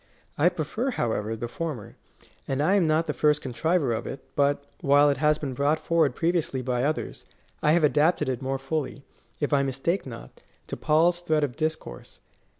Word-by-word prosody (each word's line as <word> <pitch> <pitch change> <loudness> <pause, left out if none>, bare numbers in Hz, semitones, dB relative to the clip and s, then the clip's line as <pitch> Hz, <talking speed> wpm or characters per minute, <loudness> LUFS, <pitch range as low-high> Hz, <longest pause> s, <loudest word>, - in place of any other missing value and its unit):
I 160 +5 +4
prefer, 180 - -3
however, 110 - -2
the 120 +2 -5
former; 125 -3 -5 0.5
and 135 - -1
I 155 +7 +3
am 190 -5 +3
not 155 +1 +2
the - - -2
first 150 -1 +2
contriver 145 +1 0
of 110 - -4
it, 135 - -7
but, 140 0 +2 0.2
while 145 -1 +5
it 140 - -2
has 150 +2 +3
been 140 -4 -4
brought 145 +4 +1
forward 160 -6 +1
previ 170 +2 +1
ously 135 -5 -2
by 125 -1 0
others, 155 +2 -3 0.3
I 150 - +4
have 170 -1 +3
adapted 150 +4 +3
it 130 -1 -2
more 135 0 -2
fully, 140 0 -4 0.4
if 145 0 -1
I 140 - +4
mistake 135 +6 -1
not, 115 -2 -10 0.2
to - - -5
Paul's 170 +3 +2
thread 155 -3 +1
of 135 -4 -2
discourse. 155 - -5
145 Hz, 190 wpm, -26 LUFS, 135-160 Hz, 0.5 s, while